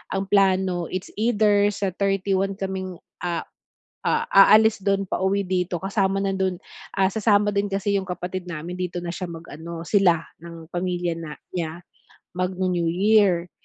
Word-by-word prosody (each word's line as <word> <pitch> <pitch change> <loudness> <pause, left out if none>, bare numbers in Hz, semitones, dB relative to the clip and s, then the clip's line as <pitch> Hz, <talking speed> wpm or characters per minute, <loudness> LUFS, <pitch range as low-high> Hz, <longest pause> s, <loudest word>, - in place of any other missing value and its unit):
ang 195 0 -3
plano, 185 -3 +2
it's 185 0 -5
either 210 -3 +3
sa 195 -1 -1
31 195 0 0
kaming, 190 -1 -4 0.2
a 175 -2 -2 0.6
a 465 0 +1
aalis 215 +1 +7
do'n 195 0 +1
pauwi 195 +1 0
dito 180 -1 -1
kasama 195 +1 0
na 195 - 0
do'n 190 -1 0 0.4
ah, 190 -1 +2
sasama 205 -1 +3
din 200 0 0
kasi 200 0 0
yung 190 - -9
kapatid 180 0 -5
namin, 170 +1 -5
dito 180 -1 -4
na 175 -1 -3
siya 185 0 -5
mag-ano 165 0 -8
sila 175 -4 +3 0.2
ng 165 0 -11
pamilya 175 -1 -1
na 155 -3 -7 0.2
niya 170 -1 -4 0.5
magnu-New 180 -1 -1
Year. 185 -2 +3
190 Hz, 150 wpm, -24 LUFS, 175-195 Hz, 0.6 s, aalis